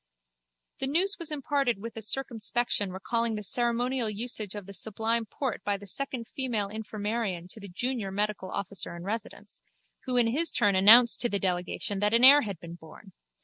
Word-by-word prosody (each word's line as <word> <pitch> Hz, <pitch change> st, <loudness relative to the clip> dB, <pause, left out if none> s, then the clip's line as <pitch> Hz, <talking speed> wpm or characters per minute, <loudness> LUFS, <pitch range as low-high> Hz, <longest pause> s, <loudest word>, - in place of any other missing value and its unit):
The 265 Hz, -, -1 dB
news 370 Hz, +8 st, +2 dB
was 335 Hz, -2 st, -4 dB
imparted 280 Hz, -5 st, -1 dB
with 225 Hz, +2 st, -8 dB
a 225 Hz, -, -6 dB
circumspection 230 Hz, -3 st, -2 dB
recalling 225 Hz, +5 st, -1 dB
the 210 Hz, -, -5 dB
ceremonial 240 Hz, +2 st, 0 dB
usage 215 Hz, -2 st, -2 dB
of 205 Hz, -2 st, -7 dB
the 200 Hz, -, -10 dB
Sublime 220 Hz, +3 st, -2 dB
Porte 260 Hz, +3 st, -4 dB
by 205 Hz, -1 st, -1 dB
the 205 Hz, -, -12 dB
second 250 Hz, +2 st, -4 dB
female 230 Hz, -7 st, -1 dB
infirmarian 210 Hz, -3 st, -4 dB
to 220 Hz, -, -10 dB
the 200 Hz, -1 st, -9 dB
junior 230 Hz, +2 st, -3 dB
medical 205 Hz, -1 st, -2 dB
officer 195 Hz, -3 st, -4 dB
in 170 Hz, -, -9 dB
residence, 215 Hz, +3 st, -6 dB, 0.4 s
who 255 Hz, -1 st, -1 dB
in 240 Hz, -, +5 dB
his 330 Hz, +4 st, 0 dB
turn 205 Hz, -1 st, +2 dB
announced 230 Hz, +5 st, +7 dB
to 240 Hz, -, +3 dB
the 205 Hz, -, -1 dB
delegation 185 Hz, +2 st, -2 dB
that 210 Hz, +2 st, +2 dB
an 235 Hz, -, +3 dB
heir 285 Hz, +3 st, +9 dB
had 200 Hz, -, -5 dB
been 170 Hz, -1 st, -10 dB
born. 170 Hz, +4 st, -14 dB
220 Hz, 185 wpm, -28 LUFS, 200-245 Hz, 0.4 s, heir